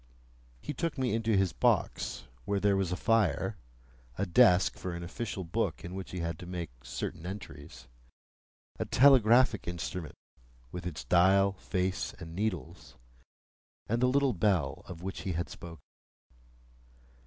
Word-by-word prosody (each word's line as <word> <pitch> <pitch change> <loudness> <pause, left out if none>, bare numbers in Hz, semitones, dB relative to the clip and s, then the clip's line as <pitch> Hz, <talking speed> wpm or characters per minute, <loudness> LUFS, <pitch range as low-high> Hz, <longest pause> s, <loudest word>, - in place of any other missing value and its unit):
He - - -4
took 165 -2 -2
me 130 -4 0
into 110 -2 +1
his 95 -2 +2
box, - - 0 0.2
where 100 -1 0
there 100 0 +3
was 95 -2 0
a - - 0
fire, 105 -3 +1 0.6
a 100 - 0
desk 95 -1 +5
for 90 -2 -5
an 85 - -6
official 95 +2 -4
book 85 0 -2
in 90 - -6
which 95 0 -6
he 90 - -4
had 85 -1 -3
to 90 - -9
make 85 -4 -5
certain 65 +5 -5
entries, 90 -9 -8 0.9
a - - -1
telegraphic 125 -4 +5
instrument 85 -2 -5 0.6
with 90 0 -5
its 80 -4 -5
dial, 95 +2 +4
face, 95 -1 -2
and 80 0 -9
needles, 90 - -4 0.9
and 115 +2 -1
the 125 - +5
little 140 -1 +3
bell 90 -8 +1
of 90 -1 -9
which 95 0 -5
he 95 - -2
had 85 +1 -3
spoken. 85 -4 -10
95 Hz, 150 wpm, -30 LUFS, 85-110 Hz, 0.9 s, desk